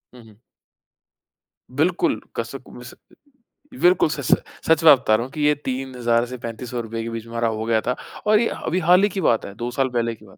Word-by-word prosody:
हुँ, 120 - -14
हुँ। 105 -2 -19 1.4
बिल्कुल, 170 +5 +1 0.2
कसक - - -5
मिस - - -11
अ, - - -29 0.9
बिल्कुल 175 -2 +4
सच, 140 -3 -4
सच - - +4 0.2
सच 160 +1 +3
बात 145 -5 +8
बता 110 -4 +2
रहा 115 - 0
हूँ 130 - -12
कि 155 - -5
ये 150 0 +4
3000 125 -3 -1
से 125 +1 -8
3500 120 +1 -5
रुपए 115 0 -5
के 115 - -4
बीच 115 -1 -6
में 115 - -13
हमारा 115 0 0
हो 110 0 -3
गया 115 -1 +2
था 125 - +1 0.3
और 210 0 +5
ये 230 - +2 0.2
अभी 180 +3 0
हाल 180 +2 +6
ही 205 - +4
की 195 0 -4
बात 115 -8 +2
है, 100 - -8
2 120 +2 -4
साल 130 +1 0
पहले 115 -2 -1
की 110 - -19
बात 95 - -18
125 Hz, 230 wpm, -22 LUFS, 115-150 Hz, 1.4 s, बात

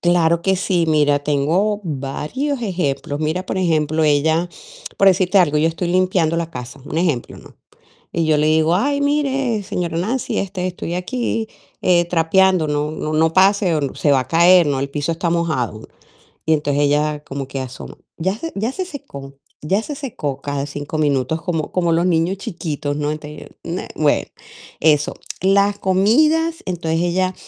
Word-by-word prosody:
Claro 170 -1 +2
que 190 -1 +2
sí. 180 -2 +1
Mira, 150 -2 +3
tengo 165 +9 +1
varios 165 - -3
ejemplos. 145 -7 -2
Mira, 160 +4 -1
por - - -2
ejemplo, 160 -3 +1
ella, 160 +3 +2 0.5
por 195 - +5
decirte 190 +1 +3
algo, 150 -4 +3
yo 160 +2 +3
estoy 170 +2 -3
limpiando 180 -3 +2
la 170 -1 -2
casa, 125 0 -8
un 155 - -3
ejemplo, 155 -9 -1
¿no? - - -16 0.6
Y 165 -1 0
yo 155 -1 +3
le 150 +1 +2
digo: 160 +2 +3
"Ay, 280 +8 +1
mire, 275 -6 0
señora 180 -4 -3
Nancy, 225 +8 -1
este, 185 -2 -3
estoy 175 -1 -4
aquí, 225 +4 -2 0.3
eh, 175 -1 +4
trapeando. 180 +1 +3
No 150 0 -1
no 155 0 -4
no 160 +1 +2
pase 190 -1 +4
o 140 -3 -2
se 145 - +1
va 135 - +4
a 130 - -6
caer, 175 +1 +6
¿no? 140 -2 0
El 140 - -2
piso 145 +3 -2
está 165 +1 -2
mojado". 155 -11 -1 0.6
Y 160 - +3
entonces 145 -1 +1
ella 150 +1 +1
como 135 -1 -6
que 135 0 -5
asoma: 130 -1 -8 0.2
"Ya 190 +5 -1
se 330 +7 -5
ya 220 +5 -1
se 375 +7 -4
secó 260 - -9 0.3
ya 190 +8 +1
se 295 - -6
secó", 185 - -4
cada 140 -1 -3
5 145 +2 -5
minutos, 150 +1 0
como 165 -2 -3
como 175 -2 +1
los 165 +2 +2
niños 175 +2 +1
chiquitos, 160 - -4
¿no? 150 0 -1
Entonces 150 0 -8
yo - - -6
nah, - - -4
bueno, - - +2 0.5
eso. 150 -1 +2 0.3
Las 200 +2 +3
comidas, 305 - +2
entonces 165 -3 -1
ella 185 +1 0
165 Hz, 175 wpm, -19 LUFS, 150-190 Hz, 0.6 s, caer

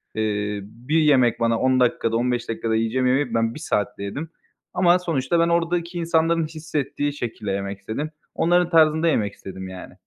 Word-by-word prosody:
Eee, 105 -1 -1
bir 120 +10 -3
yemek 130 -6 +4
bana 115 -1 +1
10 130 0 +2
dakikada, 115 -2 +1
15 120 0 -1
dakikada 115 0 -1
yiyeceğim 115 +3 +1
yemeği 135 +3 +1
ben 115 0 +1
1 - - -7
saatte 105 - -2
yedim 145 +11 -5 0.4
ama 180 0 +4
sonuçta 165 -2 0
ben 170 0 +3
oradaki 170 +1 0
insanların 165 -1 +1
hissettiği 145 -2 -3
şekilde 115 -6 -4
yemek 100 0 -3
istedim. 110 +10 -4 0.3
Onların 175 +1 +2
tarzında 160 0 +4
yemek 105 -10 +1
istedim 95 -1 -8
yani. 95 -1 -9
130 Hz, 165 wpm, -23 LUFS, 110-165 Hz, 0.4 s, yemek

